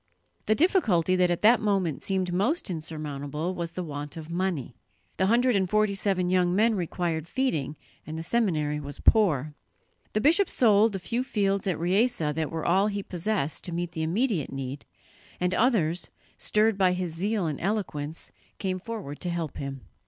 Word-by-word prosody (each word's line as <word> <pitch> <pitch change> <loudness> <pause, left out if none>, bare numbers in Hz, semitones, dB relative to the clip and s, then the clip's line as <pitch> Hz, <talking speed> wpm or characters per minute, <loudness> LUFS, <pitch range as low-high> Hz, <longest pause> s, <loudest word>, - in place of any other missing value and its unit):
The 215 - +4
difficulty 215 - +3
that 180 -1 +3
at 175 +2 -1
that 230 +3 +7
moment 195 -8 0
seemed 185 -2 -1
most 210 - 0
insurmountable 155 0 -4
was 170 -2 -4
the 180 - -3
want 145 -1 -5
of 160 0 -8
money. 170 -9 -2 0.4
The 190 - +2
hundred 240 +2 +3
and 190 -2 +1
forty 215 0 +2
seven 195 -2 0
young 180 -1 +2
men 225 +3 +4
required 170 -4 -2
feeding, 160 - -1 0.3
and 155 +1 -5
the 165 - -4
seminary 160 -8 0
was 145 -1 -7
poor. 155 - +3 0.6
The 215 - +2
bishop 335 - +4
sold 215 -2 +4
the - - -1
few 230 +7 -2
fields 200 -5 0
at 180 -5 0
Riese 200 +9 +2 0.2
that 155 0 -2
were 160 -1 -4
all 190 +4 +3
he 200 -1 -3
possessed 180 -5 -2
to 175 - -4
meet 170 0 -3
the 165 -2 -4
immediate 180 - 0
need, 135 +1 -5 0.5
and 180 0 +1
others, 185 -7 +2 0.3
stirred 215 -1 +2
by 185 -1 +4
his 180 -2 -3
zeal 200 +3 -1
and 150 -3 -3
eloquence, 165 -6 -2 0.3
came 185 -1 -2
forward 195 -9 -6
to 180 - -2
help 170 -4 -3
him. 135 -1 -5
180 Hz, 175 wpm, -27 LUFS, 160-210 Hz, 0.6 s, that